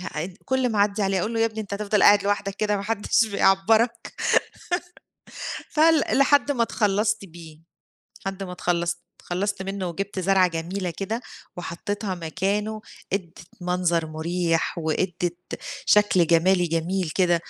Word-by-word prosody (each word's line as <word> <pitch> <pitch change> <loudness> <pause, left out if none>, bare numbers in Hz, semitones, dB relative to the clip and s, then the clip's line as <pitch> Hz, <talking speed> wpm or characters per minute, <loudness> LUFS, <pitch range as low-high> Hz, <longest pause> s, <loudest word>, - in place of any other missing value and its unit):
ح 180 - -7
إ 175 +3 -4
كُل 260 -1 +1
ما 210 - -1
أعدي 205 +1 +2
عليه 195 -1 +1
أقول 225 +5 -2
له 225 - 0
يا - - +5
ابني 220 -1 -5
أنت 200 -1 -5
هتفضل 210 0 +1
قاعد 205 -1 +7
لوحدك 200 -1 0
كده 210 0 0
ما 195 - -4
حدش 225 +1 +2
بيعبَّرك؟ 215 +3 +3 1.8
فل 315 0 +5 0.2
لحد 285 +1 +4
ما 240 -4 +2
إتخلّصت 210 -1 0
بيه، 160 -3 -13 0.7
لحد 195 0 -3
ما 180 - -6
إتخلّصت، 175 -1 -1 0.2
إتخلّصت 190 +2 -2
منه 195 -1 -3
وجبت 195 +3 -4
زرعة 185 0 +4
جميلة 175 +3 -3
كده، 220 +5 -3 0.4
وحطيتها 190 +3 -4
مكانه، 200 +6 -2 0.3
إدِّت 180 -4 -3 0.2
منظر 175 -2 +1
مريح، 165 +2 -1
وإدِّت 175 +2 -2 0.3
شكل 205 -5 +4
جمالي 175 +2 +4
جميل 165 +1 -1
كده. 180 -2 +4
195 Hz, 145 wpm, -24 LUFS, 175-210 Hz, 1.8 s, قاعد